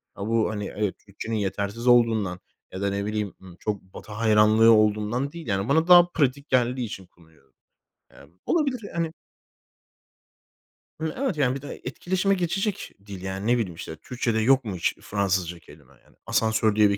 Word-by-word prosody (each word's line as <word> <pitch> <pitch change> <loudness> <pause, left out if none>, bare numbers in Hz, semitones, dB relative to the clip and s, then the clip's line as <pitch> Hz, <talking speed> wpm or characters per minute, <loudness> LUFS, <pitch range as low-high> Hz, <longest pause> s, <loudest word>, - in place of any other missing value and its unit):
A, 100 - -5
bu, 115 -1 +2
hani, 105 -2 -4
evet, 105 -2 -1
Türkçenin 105 +3 -5
yetersiz 100 +3 -2
olduğundan 110 -7 +3 0.3
ya 95 - -6
da, 100 - +1
ne 100 0 -2
bileyim, 105 -2 -2
ımm, 95 -2 -13
çok 105 -2 -3
Batı 95 +3 -13
hayranlığı 110 +1 +5
olduğundan 110 +5 +2
değil 165 -3 -9
yani 100 +1 -1
bana 160 +4 +3
daha 175 -1 +8
pratik 140 -3 0
geldiği 125 0 +1
için 95 -3 -8
kullanıyorum. 80 -6 -25 0.6
Ya, 70 - -16 0.2
bu - - 0
olabilir 280 -7 +1
yani. 165 -1 -1 1.9
Hı, 160 -1 -2
evet, 260 - -1
yani, 130 -3 +2
bir 135 - -6
de 145 - -8
etkileşime 185 +9 0
geçecek 195 +3 -2
dil, 100 -3 -8
yani, 95 +2 -4
ne 120 +1 +4
bileyim, 95 -8 -3
işte, 80 - -7
Türkçede 115 +6 -2
yok 130 +4 +4
mu 100 -4 -4
hiç 85 - 0
Fransızca 95 -4 -1
kelime, 75 -4 -18
yani? - - -25
Asansör 110 -1 +2
diye 105 -1 +5
bir 100 - 0
110 Hz, 175 wpm, -25 LUFS, 100-130 Hz, 1.9 s, daha